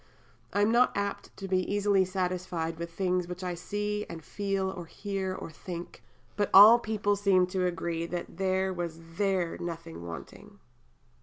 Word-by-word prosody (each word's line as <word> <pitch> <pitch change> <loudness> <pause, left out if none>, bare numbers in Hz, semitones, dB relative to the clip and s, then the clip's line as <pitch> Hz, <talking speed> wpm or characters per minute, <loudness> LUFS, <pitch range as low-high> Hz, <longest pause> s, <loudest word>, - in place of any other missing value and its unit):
I 205 - +2
am 215 - +3
not 240 -1 +4
apt 200 0 -2
to 195 - -6
be 185 -1 +2
easily 200 -2 +3
satisfied 180 -3 -2
with 170 0 -4
the 165 - -23
things 180 -1 0
which 180 +1 -6
I 180 -1 -2
see 210 +4 -2
and 165 -1 -7
feel 195 0 -2
or 180 -3 -7
hear 195 0 -3
or 165 - -7
think, 170 +2 -8 0.3
but 205 -1 0
all 215 +5 +11
people 210 -2 0
seem 195 -2 +4
to 185 -1 +2
agree 170 -1 -2
that 170 -1 -5
there 190 0 +1
was 170 -2 -4 0.2
there 190 -4 0
nothing 165 - -6
wanting." 85 -1 -9
185 Hz, 170 wpm, -29 LUFS, 175-200 Hz, 0.3 s, all